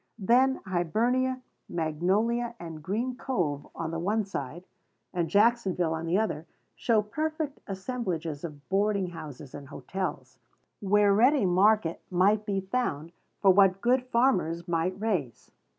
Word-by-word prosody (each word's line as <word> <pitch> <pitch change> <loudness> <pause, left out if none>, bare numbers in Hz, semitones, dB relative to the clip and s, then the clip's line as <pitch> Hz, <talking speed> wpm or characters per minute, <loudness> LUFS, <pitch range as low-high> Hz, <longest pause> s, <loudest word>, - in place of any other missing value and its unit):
Then 250 +6 +3
Hibernia, 240 +9 0 0.3
Magnolia, 200 +9 0
and 165 -2 -8
Green 230 +10 -2
Cove, 165 - -2
on 165 -1 -4
the 165 - -3
one 210 +5 0
side, 170 -3 -6 0.5
and 175 -3 -1
Jacksonville 200 -6 +2
on 160 +1 -4
the 175 +3 +2
other, 170 -7 -2 0.3
show 220 -3 +2
perfect 310 +5 -3
assemblages 190 - -4
of 145 -4 -8
boarding 200 -1 +1
houses 150 -5 -9
and 140 -1 -9
hotels, 185 +7 -5 0.4
where 205 0 +3
ready 250 +3 +4
market 185 -1 +3
might 200 +4 +2
be 195 -1 0
found 190 - -2 0.3
for 195 - +8
what 195 0 +4
good 250 +3 +2
farmers 235 -10 +1
might 175 +2 -1
raise. 185 - -2
195 Hz, 135 wpm, -28 LUFS, 165-235 Hz, 0.5 s, for